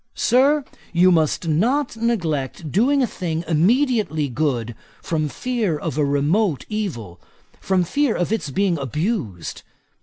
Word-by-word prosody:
Sir, 275 Hz, +3 st, +3 dB, 0.3 s
you 180 Hz, +2 st, +5 dB
must 160 Hz, 0 st, +1 dB
not 240 Hz, -, +1 dB
neglect 165 Hz, -, -2 dB
doing 265 Hz, +7 st, +3 dB
a -, -, +4 dB
thing 165 Hz, -7 st, -3 dB
immediately 185 Hz, -, +2 dB
good, 120 Hz, -4 st, -1 dB, 0.3 s
from 155 Hz, -2 st, -2 dB
fear 225 Hz, -, -1 dB
of 145 Hz, -, -4 dB
remote 150 Hz, +5 st, +1 dB
evil; 120 Hz, -, -4 dB, 0.4 s
from 190 Hz, -2 st, +1 dB
fear 280 Hz, -, +1 dB
of 175 Hz, +3 st, -1 dB
its 220 Hz, -9 st, -2 dB
being 180 Hz, +2 st, 0 dB
abused. 140 Hz, -, -3 dB
170 Hz, 125 wpm, -21 LUFS, 150-225 Hz, 0.4 s, you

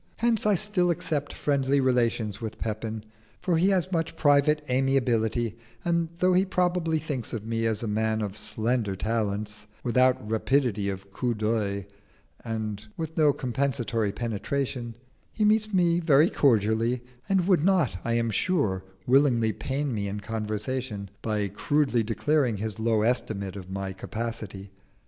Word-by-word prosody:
Hence 230 Hz, -2 st, +2 dB
I 210 Hz, -, +5 dB
still 190 Hz, -2 st, +1 dB
accept 150 Hz, -3 st, -1 dB
friendly 140 Hz, -1 st, +1 dB
relations 120 Hz, -4 st, +1 dB
with 110 Hz, -1 st, -5 dB
Pepin, 110 Hz, 0 st, -4 dB, 0.4 s
for 175 Hz, -3 st, +1 dB
he 180 Hz, +4 st, +4 dB
has 185 Hz, -1 st, +1 dB
much 165 Hz, -3 st, -1 dB
private 150 Hz, +1 st, +3 dB
amiability, 120 Hz, -4 st, +1 dB, 0.3 s
and 170 Hz, -1 st, +1 dB
though 180 Hz, +1 st, +3 dB
he 185 Hz, +1 st, +4 dB
probably 180 Hz, -3 st, +1 dB
thinks 145 Hz, -7 st, -4 dB
of 110 Hz, -3 st, -4 dB
me 115 Hz, 0 st, 0 dB
as 110 Hz, 0 st, -1 dB
a -, -, -2 dB
man 110 Hz, +1 st, 0 dB
of 100 Hz, -1 st, -4 dB
slender 110 Hz, -1 st, -1 dB
talents, 105 Hz, 0 st, -2 dB, 0.2 s
without 125 Hz, -2 st, +2 dB
rapidity 110 Hz, -2 st, +1 dB
of 95 Hz, 0 st, -6 dB
coup 120 Hz, +4 st, -1 dB
d'oeil 105 Hz, -2 st, -1 dB, 0.6 s
and 110 Hz, -2 st, -4 dB
with 160 Hz, -1 st, -4 dB
no 150 Hz, -2 st, +5 dB
compensatory 125 Hz, -5 st, -1 dB
penetration, 120 Hz, +2 st, -3 dB, 0.4 s
he 215 Hz, -, +1 dB
meets 215 Hz, 0 st, +3 dB
me 175 Hz, -3 st, +3 dB
very 160 Hz, -1 st, +4 dB
cordially, 115 Hz, -1 st, +2 dB, 0.3 s
and 190 Hz, -2 st, +2 dB
would 180 Hz, -6 st, +4 dB
not, 180 Hz, -, +3 dB
I 115 Hz, -, 0 dB
am 115 Hz, -1 st, +1 dB
sure, 105 Hz, -, 0 dB, 0.2 s
willingly 125 Hz, -4 st, +3 dB
pain 140 Hz, 0 st, -2 dB
me 100 Hz, -2 st, -2 dB
in 100 Hz, +1 st, -4 dB
conversation 110 Hz, 0 st, -3 dB
by 105 Hz, -2 st, -1 dB
crudely 125 Hz, +5 st, +1 dB
declaring 120 Hz, +2 st, +1 dB
his 110 Hz, +1 st, -4 dB
low 110 Hz, -1 st, +2 dB
estimate 110 Hz, -5 st, -1 dB
of 95 Hz, -2 st, -8 dB
my 95 Hz, 0 st, -4 dB
capacity. 100 Hz, -1 st, -6 dB
120 Hz, 150 wpm, -27 LUFS, 110-145 Hz, 0.6 s, I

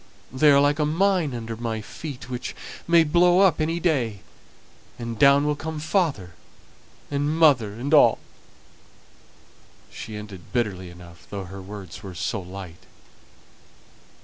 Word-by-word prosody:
They 150 Hz, +3 st, +4 dB
are 140 Hz, -1 st, +6 dB
like 145 Hz, +2 st, +2 dB
a 150 Hz, -, +2 dB
mine 175 Hz, -1 st, +1 dB
under 115 Hz, -1 st, -5 dB
my 115 Hz, -1 st, -3 dB
feet, 135 Hz, +5 st, -8 dB
which 125 Hz, -1 st, -5 dB, 0.3 s
may 170 Hz, -1 st, +6 dB
blow 175 Hz, +4 st, +4 dB
up 190 Hz, -5 st, +4 dB
any 165 Hz, +2 st, 0 dB
day; 125 Hz, -, 0 dB, 0.8 s
and 115 Hz, -2 st, -6 dB
down 140 Hz, +1 st, +6 dB
will 150 Hz, 0 st, +1 dB
come 160 Hz, +1 st, -5 dB
father 155 Hz, -, -1 dB, 0.8 s
and 145 Hz, +2 st, -1 dB
mother 130 Hz, -10 st, +4 dB
and 130 Hz, +5 st, -3 dB
all." -, -, +6 dB, 1.7 s
She 110 Hz, -, -8 dB
ended 105 Hz, -4 st, -10 dB
bitterly 100 Hz, -7 st, -2 dB
enough, 85 Hz, 0 st, -14 dB
though 100 Hz, -1 st, -5 dB
her 95 Hz, +1 st, -9 dB
words 95 Hz, -2 st, -9 dB
were 95 Hz, -3 st, -9 dB
so 100 Hz, +3 st, -2 dB
light. 90 Hz, -2 st, -10 dB
125 Hz, 140 wpm, -24 LUFS, 100-155 Hz, 1.7 s, are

